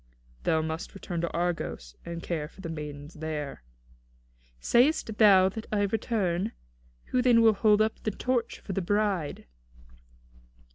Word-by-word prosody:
"Thou 160 0 +2
must 160 +4 -5
return 175 -3 -4
to 170 - -1
Argos, 170 - -3
and 170 0 -6
care 155 -4 -2
for 190 - -15
the 165 - -5
maidens 150 -1 -7
there." 155 -3 -5 1.0
"Sayest 240 - +2
thou 195 -4 +7
that 220 +3 -7
I 205 -1 +2
return? 200 -2 -1 0.6
Who 255 - +3
then 240 -2 +5
will 220 -1 +6
hold 210 +1 +4
up 220 - -2
the - - -1
torch 245 +3 -1
for 195 - -5
the 195 - -1
bride?" 200 -4 -1
190 Hz, 145 wpm, -28 LUFS, 160-215 Hz, 1.0 s, thou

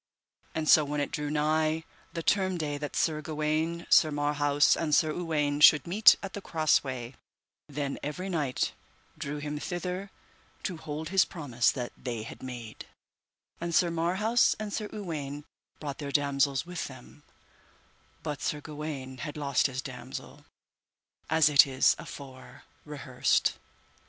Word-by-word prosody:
And 160 -1 -1
so 155 - +7
when 145 0 -2
it 145 - -2
drew 150 0 -3
nigh 155 +1 +1 0.3
the 165 - -4
term 190 -1 +2
day 145 -3 -3
that 145 0 -5
Sir 155 -2 +1
Gawaine, 155 +2 -1
Sir 155 - +7
Marhaus, 145 0 +2
and 150 -3 +1
Sir 155 -3 +3
Uwaine 150 -4 -1
should 150 -1 +8
meet 205 +5 +7
at 195 - -6
the 205 - -5
cross 155 -4 +2
way, 130 -2 -5 0.5
then 140 -1 -3
every 180 +6 -4
knight 150 -8 -1 0.4
drew 150 -2 -4
him 150 0 -4
thither 180 +4 -4 0.5
to 185 -4 -3
hold 155 0 -5
his 195 +1 +5
promise 130 -9 0
that 125 -3 -4
they 120 -4 -5
had - - -10
made; 120 -4 -8 0.7
and 170 -1 -2
Sir 175 0 +4
Marhaus 190 +8 +2
and 215 -1 -4
Sir 210 -1 -3
Uwaine 150 -8 -5 0.4
brought 145 -3 -5
their 140 -2 -4
damosels 140 0 +1
with 175 -1 -4
them, 130 +2 -13 1.0
but 150 -3 -4
Sir 150 - -1
Gawaine 145 -4 -6
had 145 +4 -5
lost 140 -2 +2
his 130 -1 -5
damosel, 125 -2 -8 0.8
as 160 0 +5
it 145 -1 +7
is 130 -1 +3
afore 130 -2 -10 0.2
rehearsed. 140 -4 +1
150 Hz, 150 wpm, -29 LUFS, 140-165 Hz, 1.0 s, should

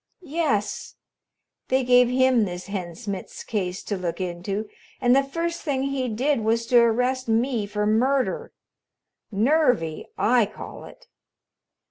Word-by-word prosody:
"Yes. 285 -11 -1 0.7
They 260 0 +2
gave 245 0 +5
him 255 -3 +3
this 180 -1 -6
Hen 185 -4 -5
Smitz 195 +2 -6
case 185 -4 -3
to 205 - -3
look 180 -2 -4
into, 185 +4 -3 0.3
and 245 -1 +4
the 275 - +5
first 335 +4 -3
thing 275 -4 -1
he 270 -2 -1
did 260 +5 +1
was 225 +1 0
to 245 0 +5
arrest 250 +2 +2
me 225 -1 +1
for 210 0 -2
murder. 265 - +1 0.8
Nervy, 225 - +1
I 235 -2 +3
call - - -10
it." - - -15
235 Hz, 135 wpm, -24 LUFS, 205-265 Hz, 0.8 s, gave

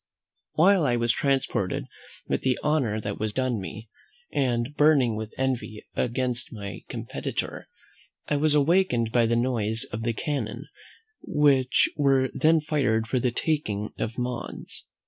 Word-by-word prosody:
While 185 +2 +5
I 125 -4 +2
was 120 0 +2
transported 135 -8 0 0.4
with - - -1
the 130 -1 +1
honour 130 -8 +1
that 100 -1 -4
was 110 0 -1
done 130 -4 0
me, 110 +4 -8 0.5
and 125 0 0
burning 145 -7 +4
with 110 0 -5
envy 130 -5 -2
against 125 0 -1
my 100 -3 -6
competitor, - - -4 0.6
I 145 - +1
was 150 +1 +3
awakened 145 -7 +3
by 120 -1 +3
the 115 - +2
noise 115 -1 0
of 110 - -3
the 115 0 0
cannon 145 +5 -3 0.6
which 140 -6 +3
were 135 -3 +3
then 160 0 +4
fired 135 -8 +1
for 130 +2 0
the 125 - +1
taking 115 -6 -1
of 115 - -3
Mons. 125 -1 -5
125 Hz, 145 wpm, -26 LUFS, 115-145 Hz, 0.6 s, While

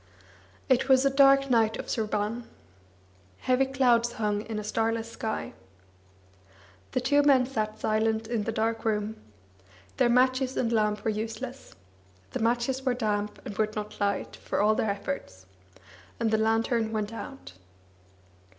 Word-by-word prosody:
It 265 +1 +2
was 265 0 +5
a 275 - +4
dark 275 0 +5
night 225 -2 +3
of - - -6
Sraban. 215 +1 -2 1.0
Heavy 260 +1 +2
clouds 240 -3 +2
hung 210 -3 -1
In 220 -1 -4
a 210 - -3
starless 225 +1 -1
sky. 220 -1 -4 1.4
The - - +2
two 285 +3 +3
men 275 -3 +5
sat 215 -4 -3
silent 220 +1 0
in 220 -2 -2
the - - -1
dark 225 0 -1
room. 215 0 -1 0.8
Their - - +3
matches 255 +1 +2
and 235 -2 0
lamp 210 -1 +1
were 220 - +2
useless. 225 +5 -6 0.6
The - - -3
matches 240 +3 0
were 255 -2 0
damp, 210 -3 -2
and 205 - -6
would 215 0 0
not 210 0 -6
light, 200 -1 -1
for - - -3
all 210 +1 +4
their 215 - 0
efforts, 200 - -5 0.7
and 230 -1 +1
the 220 - +3
lantern 225 0 +1
went 215 0 -2
out. 90 - -8
225 Hz, 150 wpm, -28 LUFS, 215-255 Hz, 1.4 s, was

